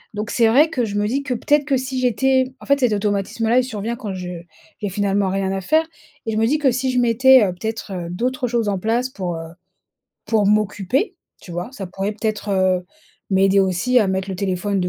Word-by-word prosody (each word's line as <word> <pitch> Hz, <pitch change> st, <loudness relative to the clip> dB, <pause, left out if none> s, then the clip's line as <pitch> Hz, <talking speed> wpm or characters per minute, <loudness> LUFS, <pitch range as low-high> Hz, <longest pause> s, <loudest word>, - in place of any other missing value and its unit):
donc 210 Hz, +1 st, -4 dB
c'est 230 Hz, -2 st, +3 dB
vrai 280 Hz, +8 st, +5 dB
que 260 Hz, -6 st, -1 dB
je 205 Hz, -2 st, -5 dB
me 205 Hz, 0 st, +1 dB
dis 265 Hz, +6 st, -1 dB
que 270 Hz, -3 st, -3 dB
peut-être 290 Hz, +5 st, +2 dB
que 275 Hz, -2 st, +1 dB
si 260 Hz, 0 st, -3 dB
j'étais 260 Hz, +2 st, +2 dB
en -, -, -12 dB
fait, 280 Hz, 0 st, +3 dB
cet 250 Hz, -5 st, +2 dB
automatisme-là, 210 Hz, +3 st, 0 dB
il -, -, +2 dB
survient 230 Hz, -1 st, -4 dB
quand 220 Hz, -5 st, -6 dB
je 180 Hz, -1 st, -6 dB, 0.5 s
j'ai 205 Hz, -, -2 dB
finalement 200 Hz, 0 st, 0 dB
rien 190 Hz, 0 st, -1 dB
à 195 Hz, 0 st, -2 dB
faire 315 Hz, -, +2 dB, 0.4 s
et 225 Hz, -, -2 dB
je -, -, -1 dB
me 220 Hz, -, +3 dB
dis 295 Hz, +5 st, +2 dB
que 275 Hz, -4 st, +3 dB
si 255 Hz, +2 st, -1 dB
je 250 Hz, -, +1 dB
mettais, 250 Hz, +1 st, +6 dB
heu, 185 Hz, -, -2 dB
peut-être, 220 Hz, +2 st, -5 dB
heu, 175 Hz, -2 st, -5 dB
d'autres 250 Hz, +7 st, -1 dB
choses 230 Hz, -3 st, 0 dB
en 200 Hz, -, 0 dB
place 235 Hz, +6 st, 0 dB
pour, 185 Hz, -8 st, -4 dB
heu, 165 Hz, 0 st, -7 dB, 0.8 s
pour 215 Hz, -2 st, +2 dB
m'occuper, 210 Hz, -, +1 dB, 0.3 s
tu -, -, -13 dB
vois? 175 Hz, +3 st, -4 dB
Ça 195 Hz, -7 st, -6 dB
pourrait 195 Hz, +3 st, -3 dB
peut-être, 215 Hz, -1 st, -3 dB
heu, 185 Hz, -2 st, +2 dB, 0.5 s
m'aider 195 Hz, +1 st, +4 dB
aussi 190 Hz, +7 st, +2 dB
à 215 Hz, -, +2 dB
mettre 190 Hz, 0 st, -2 dB
le 190 Hz, -, -4 dB
téléphone 195 Hz, +1 st, -1 dB
de 180 Hz, -, 0 dB
215 Hz, 230 wpm, -20 LUFS, 195-250 Hz, 0.8 s, mettais